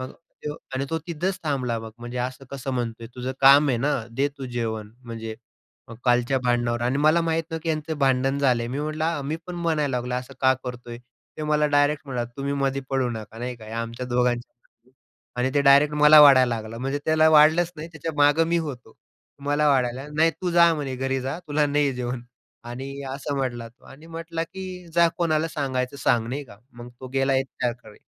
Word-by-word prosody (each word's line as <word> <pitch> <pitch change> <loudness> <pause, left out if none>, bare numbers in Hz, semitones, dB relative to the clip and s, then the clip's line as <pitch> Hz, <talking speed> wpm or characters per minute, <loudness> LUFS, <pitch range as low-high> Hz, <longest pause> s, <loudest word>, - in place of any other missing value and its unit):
मग 130 - -6
तो 150 -3 -9 0.2
आणि 135 +1 -1
तो 165 - 0
तिथंच 175 +3 -2
थांबला 130 -6 -1
मग 110 0 -8
"म्हणजे, 120 +1 -6
असं 130 +2 -4
कसं 135 -1 -5
म्हणतोय? 115 -1 -4
तुझं 130 +1 -4
काम 140 +2 +7
आहे 125 - +2
ना, 145 +5 +1 0.2
दे 135 +5 0
तू 135 - -5
जेवण. 110 -3 -4
म्हणजे 115 -2 -6 0.5
मग 115 - -9
कालच्या 125 +1 +2
भांडणावर" 120 -1 +1
आणि 125 +3 0
मला 155 +3 +4
माहीत 165 0 0
नाही 160 0 -4
की 165 - -4
यांचं 155 -1 -2
भांडण 135 0 +2
झालं 125 -4 +2
आहे, 115 - -4
मी 135 +3 -3
म्हटलं 155 +1 -2
आ, 160 -3 -1
मी 150 +4 -3
पण 180 - -6
म्हणायला 155 -6 0
लागलो, 125 0 -3
"असं 125 +2 -5
का 130 0 +5
करतोय?" 120 -1 -7 0.4
तो 155 - -3
मला 150 0 +2
डायरेक्ट 145 0 +2
म्हणाला, 125 -3 -2
"तुम्ही 140 +1 -2
मध्ये 135 -1 0
पडू 135 -2 +1
नका." 110 -1 -8
नाही 125 +1 -4
का, 110 - -13
"हे 110 - -10
आमच्या 115 +2 -4
दोघांच्या 120 0 0
मधलं 120 0 -34
आहे." - - -36 0.5
आणि 130 +1 +1
तो 145 - +4
डायरेक्ट 145 +2 +6
मला 150 +1 +8
वाढायला 130 -4 +7
लागला, 110 +1 -7
म्हणजे 135 +3 -2
त्याला 155 0 +4
वाढलंच 160 +3 +5
नाही 155 +2 -7
त्याच्या 160 +1 -5
मागं 145 +3 +4
मी 170 - +2
होतो. 130 -8 -6 0.5
मला 145 +1 +2
वाढायला 125 -2 +1
लागला, 150 +1 -11
"नाही 160 +1 +4
तू 170 +3 -4
जा 170 -1 +6
म्हणे 140 -4 -4
घरी 135 0 -1
जा, 135 +5 -4
तुला 150 +1 +2
नाही 145 0 +2
आहे 135 - -1
जेवण." 125 -1 -4 0.4
आणि 135 +3 -7
असं 140 0 -4
म्हटला 120 -3 -3
तो 115 - -26
आणि 150 +4 -14
म्हटला 165 0 -5
की, 185 0 -8
"जा 170 -1 +5
कोणाला 165 -1 +1
सांगायचं 135 -3 -2
सांग." 120 -3 +1
नाही 140 +3 -4
का? 100 -5 -15 0.2
मग 120 0 -10
तो 130 - -7
गेला 135 0 +2
एचआरकडे. 120 -4 -4
135 Hz, 215 wpm, -24 LUFS, 125-150 Hz, 0.5 s, मला